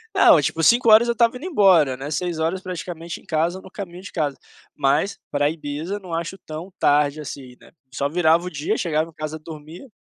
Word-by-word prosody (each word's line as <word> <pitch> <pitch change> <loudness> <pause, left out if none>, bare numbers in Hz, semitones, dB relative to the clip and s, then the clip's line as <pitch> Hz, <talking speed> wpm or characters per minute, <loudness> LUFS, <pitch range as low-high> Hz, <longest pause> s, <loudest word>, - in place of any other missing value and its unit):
Não, 160 - +7
tipo, 160 +3 -1
5h 230 +2 +6
eu 235 - +1
estava 235 +1 +2
indo 305 - -9
embora, 185 - +4
né, 140 +3 -6
6h 170 +2 -2
praticamente 175 -3 -6
em - - -24
casa 165 +3 0
ou - - -17
no 190 - -13
caminho 185 -3 -8
de 190 - -10
casa, 150 -5 -2 0.4
mas 190 +9 +1
pra 145 0 +1
Ibiza 155 +5 -5
não 185 -4 -9
acho 170 +3 -3
tão 160 +5 -8
tarde 145 +1 +2
assim, 130 -3 -9
né, - - -19 0.2
só 140 +1 -1
virava 170 +1 +3
o - - -3
dia 160 +7 -2
chegava 160 -1 -1
em - - -18
casa 155 0 -5
dormia 160 - -11
165 Hz, 205 wpm, -22 LUFS, 150-185 Hz, 0.4 s, Não